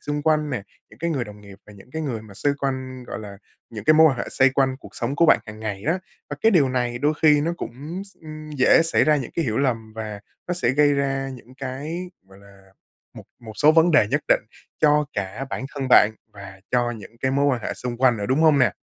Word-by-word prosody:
xung 145 0 -3
quanh 155 -1 +1
nè, 120 -7 -3 0.3
những - - -17
cái 170 0 -2
người 135 -6 -1
đồng 105 -1 -12
nghiệp, 100 -1 -14
và 105 - -13
những 100 +5 -16
cái 160 - -3
người 120 -7 -4
mà 105 -2 -14
xoay 140 +8 0
quanh, 130 -2 -4
gọi - - -6
là, 100 -2 -10 0.3
những 110 -3 -8
cái 155 - +5
mối 160 +1 +7
quan 130 - -4
hệ - - -2
xoay 135 0 +4
quanh 130 -1 +1
cuộc - - -14
sống 130 +5 -2
của 170 - +4
bạn - - +6
hằng 110 0 -10
ngày 105 -3 -4
á. 165 - 0 0.3
Và - - -4
cái 225 - +5
điều 150 -8 +4
này 120 -1 -1
đôi 150 +3 +1
khi 150 -2 +6
nó 165 +3 -1
cũng 150 +10 -6
s 195 - -18
ừm, 155 -1 -9
dễ 145 +2 +4
xảy 165 - +2
ra 155 -1 +4
những 130 - -4
cái 165 - 0
hiểu 110 -4 -1
lầm, 115 -5 -1
và 105 -2 -6 0.3
nó 180 - 0
sẽ 150 -9 +1
gây 145 +2 +3
ra 135 -1 -1
những 125 +1 -15
cái, 145 +7 -5 0.2
gọi 95 - -17
là, 100 -1 -19 0.4
một - - -11 0.2
một 110 -2 -10
số 150 +1 +5
vấn 165 +2 +5
đề 155 -10 +5
nhất - - +1
định - - +4 0.4
cho 150 -1 +4
cả 100 +6 -4
bản 130 - -4
thân 135 -2 -3
bạn 110 -3 +7 0.2
và 100 -1 -11
cho 120 -1 +1
những 115 0 -10
cái 130 - 0
mối 140 +1 +1
quan 130 -4 +1
hệ - - -3
xung 125 -1 -5
quanh 125 -2 +3
nữa, 100 - -4
đúng 130 +4 +1
hông 155 -3 +5
nè? 130 - +3
130 Hz, 260 wpm, -23 LUFS, 110-150 Hz, 0.4 s, mối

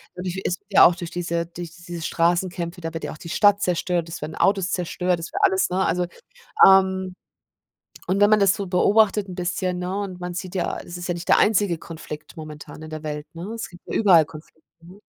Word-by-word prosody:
natürlich 185 +1 -5
ist 180 - -1
ja 195 - +7
auch 175 - +5
durch 175 -2 -7
diese 170 -1 -2
durch 170 -1 -8
diese 175 -1 -8
Straßenkämpfe, 175 +1 -1
da 165 -1 -4
wird 165 - -5
ja - - -4
auch - - -12
die 165 - -9
Stadt 205 +3 +4
zerstört, 175 -1 -1
es 170 - -7
werden 155 +1 -6
Autos 195 -2 +1
zerstört, 180 0 -1
es 165 - -7
wird - - -3
alles, 190 -1 +2
ne, 185 +1 0
also 175 +1 0 0.6
ähm, 190 -1 +3 0.9
und 190 +2 0
wenn 205 +1 +6
man 215 - +6
das 195 -1 +4
so 200 - -4
beobachtet 200 +2 +3
'n 180 - -7
bisschen, 180 0 -2
ne, 180 +2 -3
und 190 -3 -5
man 180 0 -4
sieht 180 +1 -6
ja, 185 - -2
es 175 - -9
ist 175 0 -6
ja 175 - 0
nicht 170 0 -8
der - - +6
einzige 205 -4 +3
Konflikt 155 -1 -9
momentan 155 -1 -9
in 155 - -9
der 155 -1 -6
Welt, 150 -1 -5
ne? 170 +4 -7
Es 230 - -5
gibt 175 0 -15
ja - - -5
überall 180 -7 +6
Konflikte, 160 +1 -14 0.2
ne? 180 +4 -15
180 Hz, 225 wpm, -23 LUFS, 170-190 Hz, 0.9 s, ja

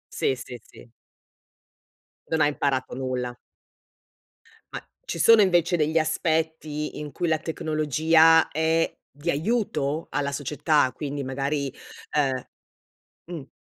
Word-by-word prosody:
Sì, 135 - +1
sì, 125 -1 -9
sì. 115 - -17 1.4
Non 160 -1 +1
ha 145 - +5
imparato 140 -4 -1
nulla. 125 -2 -3 1.4
Ma - - -5 0.2
ci 170 - -4
sono, 230 +6 +7
invece, 175 -1 +2
degli 155 +1 +2
aspetti 155 -1 -1
in 150 -1 -6
cui 175 - -2
la 160 -1 +2
tecnologia 160 +1 +3
è 160 +2 +1 0.2
di 150 +4 -4
aiuto 160 - -1
alla 140 -1 -1
società, 145 0 +1
quindi, 145 -2 -4
magari, 140 +1 -2 1.6
uhm 175 -1 -6
mh. 135 - -12
155 Hz, 115 wpm, -25 LUFS, 140-160 Hz, 1.6 s, sono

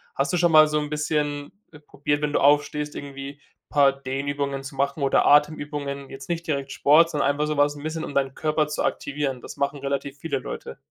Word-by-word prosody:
Hast - - 0
du - - +2
schon 175 -1 +3
mal 155 -1 +8
so 150 0 0
'n 150 -1 -4
bisschen, 150 -1 -2 0.2
äh, 150 - -14
probiert, 145 0 -2
wenn 150 -1 -1
du - - +3
aufstehst, 145 +1 +2
irgendwie 140 0 -7 0.3
paar 140 -2 +5
Dehnübungen 140 +1 -3
zu 135 +1 -8
machen 140 +2 -1
oder 135 - +3
Atemübungen, 145 -2 +1
jetzt 135 0 -10
nicht 170 -1 -2
direkt 140 -3 -2
Sport, 160 +4 +5
sondern 150 -3 +1
einfach 145 +1 0
so 150 -1 -2
was 145 0 +3
'n 145 - -10
bisschen, 160 +1 -3
um - - -7
deinen 135 -1 0
Körper 155 -1 0
zu 150 - -2
aktivieren? 140 -3 -2
Das - - -10
machen 140 +1 -1
relativ 140 0 -3
viele 165 - -2
Leute. 65 - -7
145 Hz, 215 wpm, -24 LUFS, 140-150 Hz, 0.3 s, mal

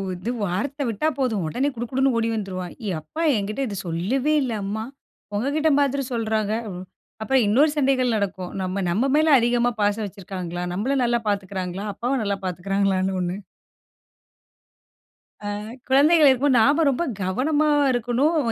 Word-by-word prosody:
இது 185 +7 -4
வார்த்த 265 +10 -2
விட்டா 230 +8 -1
போதும் 225 -8 0
உடனே 255 - -1
குடு 240 +1 -3
குடுன்னு 265 0 +2
ஓடி 230 0 +1
வந்துருவான். 185 -4 -4
"என் 175 -4 -1
அப்பா 155 - -7
என்கிட்ட 210 +5 -2
இது 205 - -5
சொல்லவே 240 - 0
இல்ல 255 -4 -2
அம்மா. 210 +3 -3 0.5
உங்கக்கிட்ட 285 +8 +1
மாதிரி 280 -1 +1
சொல்றாங்க." 220 -2 0 0.7
அப்புறம் 265 +2 +2
இன்னொரு 285 +8 +4
சண்டைகள் 260 -3 +2
நடக்கும். 190 -3 -3
நம்ம 185 +1 -2
நம்ம 230 +10 +1
மேல 310 -1 +4
அதிகமா 240 +1 +2
பாசம் 205 +1 +1
வச்சிருக்காங்களா? 185 -3 -6
நம்மள 245 +9 -1
நல்லா 240 0 +2
பார்த்துக்கிறாங்களா? 195 -1 -3
அப்பாவ 250 +5 -1
நல்லா 200 -1 -1
பார்த்துக்கிறாங்களான்னு 190 +1 0
ஒ்ண்ணு. 180 +2 -3 2.1
ஆ - - -2 0.4
குழந்தைகள் 295 +4 +6
இருக்கும்போது 260 0 +3
நாம 290 +7 +4
ரொம்ப 275 +5 0 0.2
கவனமா 285 +11 +1 0.2
இருக்கணும். 245 +7 +1
225 Hz, 140 wpm, -23 LUFS, 195-270 Hz, 2.1 s, குழந்தைகள்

